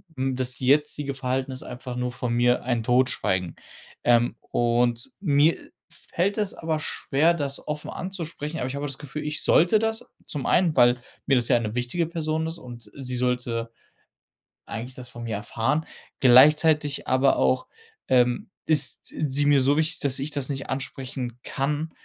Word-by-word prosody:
hm, 130 0 -1
das 130 0 -2
jetzige 140 +1 +1
Verhalten 130 0 -2
ist 130 - -7
einfach 125 0 -7
nur 125 0 -2
von 120 -1 -3
mir 120 +1 +2
ein 120 -2 0
Totschweigen, 110 -8 +1 0.5
ähm, 120 -1 +3
und 120 0 +1
mir 155 -3 +3 0.6
fällt 195 +5 0
es 210 -2 -1
aber 160 -1 -2
schwer, 155 +2 +1
das 140 -3 -4
offen 150 0 -4
anzusprechen. 170 -4 -5
Aber 125 - -2
ich 130 - -5
habe 140 - -4
auch - - -3
das 135 - -6
Gefühl, 150 +1 -6
ich 150 0 -3
sollte 175 +6 +4
das, 225 0 -2 0.2
zum 145 -3 -3
einen, 170 -4 +3
weil 120 -1 +6 0.3
mir 135 - +4
das 120 -2 +2
ja - - +4
'ne 110 -1 -4
wichtige 125 +8 -1
Person 160 -1 -2
ist, 165 +1 -5
und 120 -4 -11
sie 130 -2 -4
sollte 120 -2 -1 0.9
eigentlich 120 +3 -7
das 125 -1 -10
von 120 0 -9
mir 115 -2 -3
erfahren, 115 +9 -1 0.3
gleichzeitig 145 +3 +5
aber 130 +1 +3
auch, 130 0 +1 0.4
ähm, 125 +9 +2 0.2
ist 155 -2 +5
sie 145 -1 -1
mir 145 -2 +5
so 140 +3 +3
wichtig, 160 +1 0
dass 135 -2 +2
ich 145 +3 -3
das 140 -2 -1
nicht 135 -1 -5
ansprechen 130 -2 -5
kann, 150 +3 -2
135 Hz, 170 wpm, -25 LUFS, 125-150 Hz, 0.9 s, weil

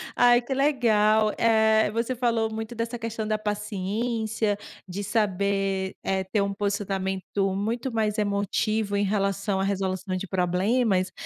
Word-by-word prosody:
Ai, 245 0 +5
que 270 - -3
legal. 220 -6 +3
Eh, 220 -1 +4
você 230 +3 -1
falou 230 -2 0
muito 220 +2 -5
dessa 230 +1 -3
questão 225 -1 -4
da 215 - +1
paciência, 210 +1 -2 0.3
de 190 +3 -5
saber, 195 -2 0
eh, 190 0 0
ter 195 +2 0
um 200 0 -1
posicionamento 195 -1 -1
muito 230 +6 -2
mais 215 -1 0
emotivo 205 +1 0
em 200 - +2
relação 195 0 0
à - - +1
resolução 190 -1 -2
de 190 +2 -4
problemas, 185 +2 +1
210 Hz, 140 wpm, -26 LUFS, 195-225 Hz, 0.3 s, Ai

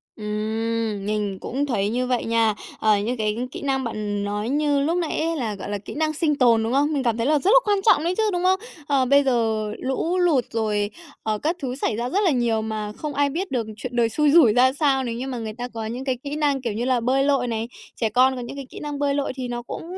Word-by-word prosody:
Ừm, 215 0 -2
mình 210 -2 -1
cũng 275 +4 -2
thấy 205 -7 0
như 250 +3 -1
vậy 250 -2 0
nha. 225 -1 +2 0.3
Ờ, 215 -1 +4
những 225 +5 -2
cái 215 -1 -1
kỹ - - -7
năng 270 -2 0
bạn 210 -3 -3
nói 205 +2 -2
như 290 0 +2
lúc 325 +5 +1
nãy 340 -3 -1
ấy, 330 +1 0
là, 225 -6 -2
gọi 195 - -7
là, 205 - -2
kỹ 200 - -9
năng 310 +1 0
sinh 305 -1 +1
tồn, 235 -4 +4
đúng 225 +2 -1
không? 290 +3 +2
Mình 280 -3 0
cảm 235 -3 +1
thấy 230 - 0
là 300 0 +3
rất 380 +8 +2
là - - +8
quan 410 -1 +2
trọng 370 -9 +5
đấy 345 +2 +1
chứ, 445 - +2
đúng 355 0 -1
không? 375 +1 +3 0.3
Ờ, 275 -3 +2
bây 280 +2 +5
giờ 225 -5 +1
lũ 295 +7 -1
lụt 335 -8 +3
rồi, 210 -2 0 0.3
ờ, 215 -1 0
các 315 - -1
thứ 255 -2 -3
xảy 260 - -1
ra 240 +2 -2
rất 385 - +1
là 365 - +4
nhiều 235 -4 +1
mà 215 -1 -4
không 300 -1 -4
ai 285 0 +2
biết 360 +7 -3
được 235 -4 -1
chuyện 245 +2 -6
đời 235 -1 +3
xui 295 +5 +2
rủi 285 -9 +6
ra 255 +2 +4
sao. 275 -2 +2
Nếu 235 -2 -3
như 250 +3 -4
mà 260 -2 -4
người 220 -2 -5
ta 245 +2 -5
có 225 -2 -6
những 245 +4 -5
cái 260 -2 0
kỹ 285 0 -4
năng, 290 -3 +1
kiểu 235 -4 -2
như 230 +4 -2
là, 255 -1 +2
bơi 260 +3 +2
lội 275 -3 +2
này, 225 -1 -2 0.3
trẻ 225 - 0
con 255 +4 +4
có 250 - -5
những 240 +3 -7
cái 275 -1 -6
kỹ - - -9
năng 295 -1 -5
bơi 285 -1 +1
lội 280 -2 -1
thì 255 -2 -4
nó 240 0 -4
cũng 240 - -7
250 Hz, 275 wpm, -23 LUFS, 225-285 Hz, 0.3 s, là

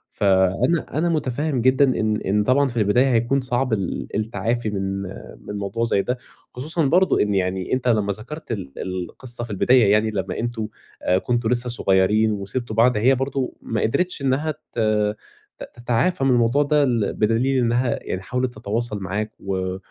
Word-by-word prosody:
فأنا 95 - +2
أنا 170 +2 +1
مُتفهم 145 -3 -1
جدًا 130 +3 +4 0.2
إن 110 -1 +1
إن 105 +2 +1
طبعًا 140 +5 +3
في 120 -2 -6
البداية 120 +5 +3
هيكون 120 +4 +2
صعب 125 -1 -1
ال 85 -11 -2
التعافي 115 +1 -1
من 95 -1 -3 0.5
من 105 - -4
موضوع 115 +4 -2
زي 100 -3 +1
ده، 125 +5 -2 0.4
خصوصًا 155 +5 -1
برضه 180 +7 +3
إن 105 -1 +1
يعني 95 +1 -1
أنت 130 -1 -1
لمّا 105 -4 +2
ذكرتَ 130 +9 -9
ال 95 -12 -4
القصة 95 +7 -5
في 120 - -7
البداية، 110 +1 +4
يعني 110 +1 +3
لمّا 95 -2 -3
أنتم 115 -2 -3 0.6
كُنتم 120 -2 0
لسّه 125 0 +1
صُغيّرين 105 0 +3
وسِبتم 110 +3 -4
بعض، 115 +1 +4
هي 130 +5 +4
برضه 135 0 -2
ما 110 -2 -2
قدرِتش 175 +7 0
إنّها 140 +4 0
ت 150 - -16 0.8
ت - - -6
تتعافي 120 +6 0
من 135 - +3
الموضوع 120 +4 +3
ده، 150 0 +2
ال 120 -6 0
بدليل 120 +5 +1
إنّها 120 +1 +1
يعني 95 - -4
حاولت 125 +4 -2
تتواصل 105 0 -3
معاك، 100 +3 -3
و 95 -1 -3
115 Hz, 170 wpm, -22 LUFS, 105-130 Hz, 0.8 s, جدًا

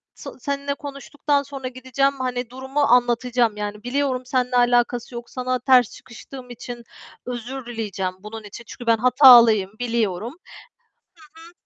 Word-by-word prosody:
tı - - -9
seninle 280 +1 -3
konuştuktan 285 0 -2
sonra 275 -2 -7
gideceğim, 260 +2 -1
hani, 250 -2 -3
durumu 265 +3 -5
anlatacağım, 245 -3 +2
yani, 210 0 -5
biliyorum 260 0 -1
seninle 250 0 -1
alakası 245 0 +1
yok, 235 0 -8
sana 255 0 -2
ters 250 -2 +4
çıkıştığım 250 +1 -12
için 240 0 -8 0.4
özür 250 +2 -6
dileyeceğim 210 -6 -4
bunun 215 +2 -9
için. 205 +3 -10
Çünkü 240 - -10
ben 230 0 +4
hatalıyım, 235 -5 +7
biliyorum. 230 -2 -2 1.0
Hı - - -14
hı. - - -24
245 Hz, 140 wpm, -22 LUFS, 230-260 Hz, 1.0 s, hatalıyım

